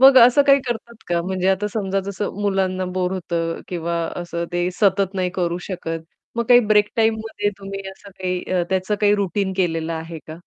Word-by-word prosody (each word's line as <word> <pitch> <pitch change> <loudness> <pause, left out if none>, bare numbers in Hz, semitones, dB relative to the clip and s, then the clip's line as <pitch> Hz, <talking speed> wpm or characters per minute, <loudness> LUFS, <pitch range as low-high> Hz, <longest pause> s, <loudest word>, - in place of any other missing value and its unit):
मग 265 0 +8
असं 250 +4 +7
काही 275 0 +6
करतात 235 0 -4
का? 175 -1 +1
म्हणजे 185 +1 -1
आता 195 +2 +2
समजा 195 -3 0
जसं 200 +1 -3
मुलांना 190 -2 0
बोर 185 0 0
होतं 165 -2 -2
किंवा 170 -1 -2 0.2
असं 170 -1 -3
ते 175 0 +1
सतत 195 -1 +3
नाही 185 -1 0
करू 175 -1 -1
शकत. 165 -3 -4 0.3
मग 235 - +1
काही 245 -1 +8
ब्रेक 210 -2 +3
टाईममध्ये 220 -2 +1
तुम्ही 195 0 -6
असं 200 +1 -14
काही 185 -1 -3
अ, 180 -1 +2
त्याचं 190 +2 +1
काही 205 -1 +5
रूटीन 200 -1 -1
केलेलं 165 -3 0
आहे 165 0 -5
का? 155 +1 -8
190 Hz, 190 wpm, -21 LUFS, 175-205 Hz, 0.3 s, मग